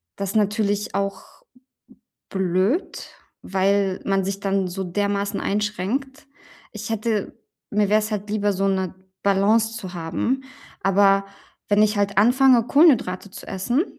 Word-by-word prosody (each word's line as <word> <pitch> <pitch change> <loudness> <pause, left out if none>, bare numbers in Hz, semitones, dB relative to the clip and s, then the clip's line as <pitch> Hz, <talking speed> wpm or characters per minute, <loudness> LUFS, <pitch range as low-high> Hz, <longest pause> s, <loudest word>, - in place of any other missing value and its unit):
das 195 -1 -4
natürlich 205 -1 0
auch 200 0 -2 1.1
blöd, 190 - -1 0.3
weil 195 0 +1
man 195 -1 +1
sich 195 +1 -3
dann 195 -1 0
so 190 +2 -4
dermaßen 200 +2 -1
einschränkt. 210 +8 -2 0.5
Ich 210 0 -7
hätte 220 -2 -2 0.4
mir 205 -1 +1
wäre 210 +1 +4
es 215 +1 -4
halt 210 0 -3
lieber, 205 -1 +1
so 195 0 -2
'ne 190 -2 -1 0.3
Balance 215 +3 +2
zu 190 -4 -8
haben, 175 +10 -2 0.4
aber 195 0 +4 0.4
wenn 205 +1 +4
ich 215 0 +2
halt 200 -1 0
anfange, 245 +1 +5
Kohlenhydrate 245 - +3
zu - - -11
essen 240 - 0
200 Hz, 135 wpm, -22 LUFS, 195-215 Hz, 1.1 s, anfange